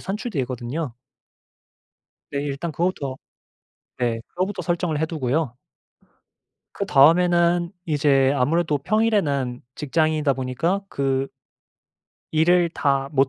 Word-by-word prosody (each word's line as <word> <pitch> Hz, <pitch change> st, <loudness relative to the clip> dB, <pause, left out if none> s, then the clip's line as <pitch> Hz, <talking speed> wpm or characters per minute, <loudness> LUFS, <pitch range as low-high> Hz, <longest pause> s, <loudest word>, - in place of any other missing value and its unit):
산출되거든요. 140 Hz, -, -4 dB, 1.4 s
네. 140 Hz, 0 st, -1 dB
일단 145 Hz, +4 st, -3 dB
그거부터 155 Hz, -4 st, -2 dB, 0.8 s
네 120 Hz, -2 st, -1 dB
그거부터 185 Hz, +3 st, -3 dB
설정을 170 Hz, -3 st, -1 dB
해두고요. 155 Hz, -4 st, -1 dB, 1.2 s
그다음에는 170 Hz, +3 st, +4 dB, 0.2 s
이제 140 Hz, -3 st, +3 dB
아무래도 150 Hz, +3 st, +1 dB
평일에는 145 Hz, -, +1 dB
직장인이다 155 Hz, 0 st, +1 dB
보니까 135 Hz, +10 st, -1 dB
그 135 Hz, -3 st, 0 dB, 1.1 s
일을 170 Hz, +2 st, +4 dB
다 140 Hz, -3 st, 0 dB
못 135 Hz, -1 st, +3 dB
150 Hz, 240 characters per minute, -23 LUFS, 135-170 Hz, 1.4 s, 그다음에는